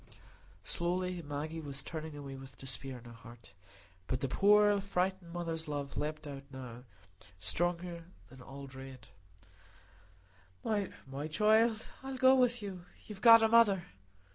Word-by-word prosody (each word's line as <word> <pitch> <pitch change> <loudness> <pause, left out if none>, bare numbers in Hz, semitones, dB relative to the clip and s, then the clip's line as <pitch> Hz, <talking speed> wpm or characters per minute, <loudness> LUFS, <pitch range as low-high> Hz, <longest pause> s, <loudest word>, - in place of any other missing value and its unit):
Slowly 180 - -1
Maggie 155 +2 -4
was 140 -2 -6
turning 155 -1 -6
away 140 -2 -7
with 135 0 -11
despair 130 0 -4
in 120 - -14
her 120 - -10
heart. 115 0 -14 0.5
But 130 - -2
the 135 - 0
poor 205 +6 +5
frightened 190 -2 -1
mother's 165 -2 -4
love 145 -2 -4
leaped 155 +1 -3
out 140 -2 -6
now, 125 -2 -9 0.5
stronger 170 - -1 0.2
than 130 +1 -14
all 140 +2 -9
dread. 130 -2 -11 1.5
"My 155 -9 -3
child! 220 +5 +3
I'll 265 0 -5
go 260 0 +6
with 245 -3 +3
you. 185 -3 -6 0.2
You've 210 -2 -9
got 230 -1 +9
a - - +6
mother." 220 -5 +5
165 Hz, 140 wpm, -33 LUFS, 135-200 Hz, 1.5 s, got